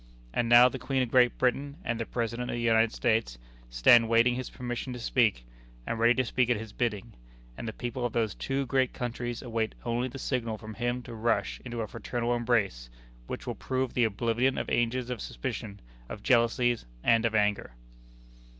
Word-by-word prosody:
And 120 -1 0
now 120 +1 +9
the 130 +1 -4
Queen 130 +1 0
of 120 - -5
Great 125 -1 +4
Britain 140 +3 0
and 115 -1 -1
the 115 - -3
President 120 +1 -3
of - - -2
the - - -3
United 115 -1 +3
States 110 - 0 0.3
stand 110 - +5
waiting 115 +1 +4
his 130 +1 -4
permission 125 +1 -5
to 125 - -7
speak, 110 - +1 0.4
and 115 - -3
ready 120 +1 +5
to 130 - +1
speak 125 +1 +1
at 120 - +3
his 110 0 -8
bidding; 115 -2 -2 0.4
and 115 - -7
the - - -2
people 120 +2 -4
of 120 -2 -1
these 110 -4 0
two 135 0 -2
great 130 0 +1
countries 120 -1 -4
await 115 -3 -2
only 120 +1 0
the 130 - -8
signal 120 -4 -2
from 110 +1 -9
him 120 +2 -2
to 120 - -9
rush 115 +1 -1
into 120 -2 -4
a 110 - -3
fraternal 120 +2 -2
embrace 110 - 0 0.4
which - - -6
will - - -3
prove 130 -1 -2
the 125 - +3
oblivion 115 +4 0
of - - -2
ages 120 +1 0
of 120 -5 -4
suspicion, 100 - -5 0.3
of 105 - -8
jealousies 120 0 +2 0.2
and 115 -1 +4
of 115 -1 0
anger." 105 - +1
120 Hz, 195 wpm, -29 LUFS, 115-125 Hz, 0.4 s, now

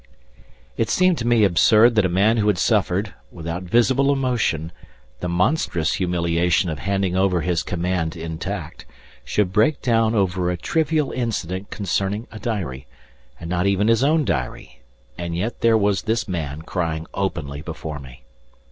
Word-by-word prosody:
It 115 - 0
seemed 185 -2 +3
to 120 - -2
me 120 -2 +4
absurd 110 +5 +5
that 105 -4 +3
a - - -5
man 100 +6 +3
who 105 -1 +1
had 105 -3 +2
suffered, 100 0 +1 0.2
without 85 +1 -5
visible 120 +8 +3
emotion, 120 - 0 0.5
the 90 - -3
monstrous 90 - +1
humiliation 85 -1 +1
of 75 - -5
handing 95 0 -1
over 95 -2 +2
his 85 0 0
command 90 -1 -2
intact, 80 -5 -6 0.4
should 100 -3 0
break 110 +8 +3
down 115 -2 +2
over 90 -3 +1
a 90 - -1
trivial 155 - 0
incident 100 -6 -3
concerning 100 +3 -2
a 110 - -9
diary, 85 - -4 0.5
and 85 - -7
not 90 +2 0
even 100 +2 +2
his 115 +2 +3
own 155 +1 +3
diary, 70 - -4 0.4
and 85 -1 -3
yet 110 +7 -3
there 115 -1 +4
was 100 -2 +1
this 110 0 -1
man 80 -5 -4
crying 80 -2 -3
openly 75 -7 -3
before 80 -1 -6
me. 65 -2 -13
95 Hz, 155 wpm, -22 LUFS, 85-110 Hz, 0.5 s, absurd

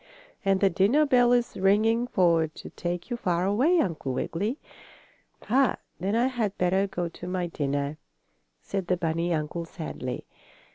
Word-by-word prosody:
And 195 -1 +2
the 195 - +5
dinner 210 - +3
bell 245 -3 +4
is 245 -1 +2
ringing 220 +5 +3
for 170 -7 +3
to 155 - -11
take 175 +6 -4
you 240 - -1
far 180 -5 0
away, 255 - +3
Uncle 160 - -1
Wiggily." 205 - -2 0.9
"Ah, 260 +4 +3 0.2
then 195 +5 -1
I 235 +2 +3
had 235 -6 -1
better 190 +2 +2
go 180 -3 -3
to 170 +1 -9
my 180 -1 -1
dinner," 145 -2 -2 0.6
said 190 -3 -3
the 180 - +1
bunny 165 0 -1
uncle, 160 +1 -2
sadly. 155 -6 -6
185 Hz, 155 wpm, -27 LUFS, 170-225 Hz, 0.9 s, the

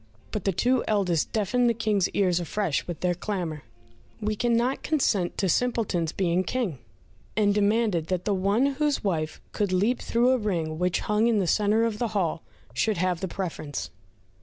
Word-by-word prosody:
But 210 - -4
the 195 - +3
two 245 +7 +2
eldest 185 -7 +1
deafened 240 +3 +2
the 235 - +1
King's 210 -4 +1
ears 180 -3 +1
afresh 175 -1 -1
with 175 -2 -6
their 180 -1 +2
clamour, 175 -4 -4 0.6
"We 215 0 -1
cannot 240 +3 +1
consent 210 - 0
to 195 - +1
Simpleton's 190 -6 0
being 180 0 +1
King," 200 - -2 0.6
and 205 -1 +3
demanded 205 -5 +1
that 185 -1 -2
the 205 - +1
one 200 +6 +2
whose 285 +1 0
wife 160 -6 -1
could 205 -3 -1
leap 205 +7 +2
through 240 +2 +2
a 260 - +2
ring 165 -7 -2
which 180 -1 +1
hung 210 +2 +2
in 230 -2 +3
the 195 - +2
centre 210 +5 +2
of 215 -2 -2
the 240 - +1
hall 170 -5 0 0.3
should 205 - +1
have 180 -1 0
the 190 - -2
preference. 155 - -5
200 Hz, 180 wpm, -26 LUFS, 175-225 Hz, 0.6 s, the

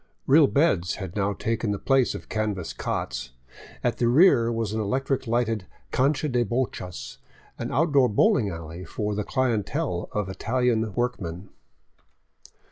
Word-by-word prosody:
Real 145 +1 +6
beds 115 - +2
had 95 -2 -7
now 100 0 0
taken 115 +2 -2
the 100 - 0
place 135 +3 +2
of - - -8
canvas 105 -5 -2
cots; 65 0 -4 0.5
at - - 0
the 120 - +3
rear 120 -4 +5
was 115 -2 -2
an 110 - -1
electric 130 +4 -1
lighted 115 -4 0 0.2
cancha 140 +3 +1
de 125 -3 +1
bochas, 115 -6 -4 0.4
or - - -3
outdoor 145 -5 +3
bowling 120 - +3
alley 85 0 -7
for 105 +2 -3
the 105 +1 -2
clientele 120 -4 -1
of 105 -2 -2
Italian 115 +2 0
workmen. 100 -7 -3
115 Hz, 140 wpm, -25 LUFS, 100-130 Hz, 0.5 s, Real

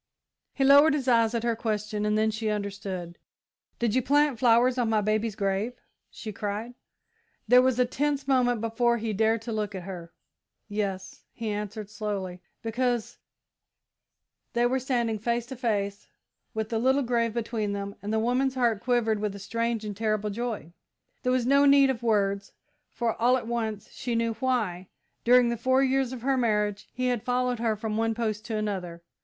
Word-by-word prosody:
He 275 - +1
lowered 285 +3 +7
his 270 -3 -3
eyes 230 -2 +3
at 230 - -1
her 235 -1 +1
question, 210 -1 -2
and 210 0 +2
then 220 0 +2
she 220 0 -2
understood. 195 -4 -4 0.6
"Did 235 -3 0
you 255 - +3
plant 285 -1 +2
flowers 245 +1 +4
on 235 -2 +1
my 220 -1 +3
baby's 215 +1 0
grave?" 200 +3 -1 0.4
she 220 - -7
cried. 210 +4 -4 0.7
There 250 +3 +7
was 255 -1 +2
a 250 - +4
tense 280 +2 -1
moment 245 -4 +2
before 235 +1 +1
he 220 -1 -3
dared 220 +2 +1
to 235 - -5
look 210 -2 -2
at 185 - -5
her. 175 -3 -8 0.6
"Yes," 200 -3 -4
he 225 -2 -5
answered, 210 0 -4
slowly, 200 -4 -4 0.2
"because 240 0 -1 0.6
" - - -56
They 240 0 +2
were 260 +2 +1
standing 240 -4 -1
face 235 +2 -1
to 265 +2 -8
face, 205 -5 -2 0.5
with 220 0 -2
the 225 - 0
little 265 +4 +3
grave 235 -2 0
between 220 -3 -2
them, 200 0 -4
and 205 - -4
the 220 - +1
woman's 250 +4 +1
heart 235 -5 +1
quivered 235 -4 +1
with 205 -1 -2
a - - -6
strange 230 +2 -2
and 205 -1 -5
terrible 215 0 -1
joy. 220 -6 -4 0.5
There 250 - 0
was 255 -2 +1
no 280 +2 +5
need 275 -1 +6
of 240 -3 -5
words, 200 -3 0 0.4
for, 235 -2 -1
all 250 +2 +5
at 240 - -6
once, 225 -3 -3
she 240 -2 -3
knew 230 0 +1
why, 220 -7 -1 0.4
during 245 0 +5
the 235 - -1
four 260 +3 +3
years 265 -1 +1
of 250 -3 -7
her 270 0 +2
marriage, 210 -4 0
he 255 0 -1
had 245 -3 0
followed 250 0 0
her 225 -2 +1
from 215 0 -3
one 225 0 +1
post 215 -2 -2
to 220 -1 -3
another. 185 -5 -4
225 Hz, 185 wpm, -27 LUFS, 210-245 Hz, 0.7 s, lowered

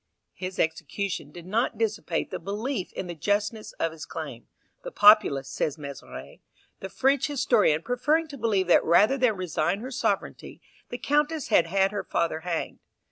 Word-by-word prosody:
His 185 0 -6
execution 160 +1 -2
did 175 +1 -11
not 225 +4 0
dissipate 215 -6 -2
the - - -4
belief 205 +4 -4
in - - -5
the 175 - -5
justness 210 +6 -1
of 165 - -2
his 160 0 -9
claim; - - -7 0.3
the - - -7
populace, 205 - +5
says 145 +2 -2
Mezeray, 140 -2 -9 0.4
the 190 - -6
French 270 +6 +1
historian, 205 - +2
preferring 295 +7 +1
to 285 - -8
believe 210 -4 +1
that 175 - +4
rather 205 +10 +4
than 245 -4 +3
resign 175 0 -1
her 260 +3 -6
sovereignty, 260 +3 -2 0.3
the 245 - -5
Countess 295 +4 0
had 165 - +4
had 195 +2 +2
her 205 - -3
father 165 -1 -1
hanged. 170 0 -4
200 Hz, 165 wpm, -26 LUFS, 170-245 Hz, 0.4 s, populace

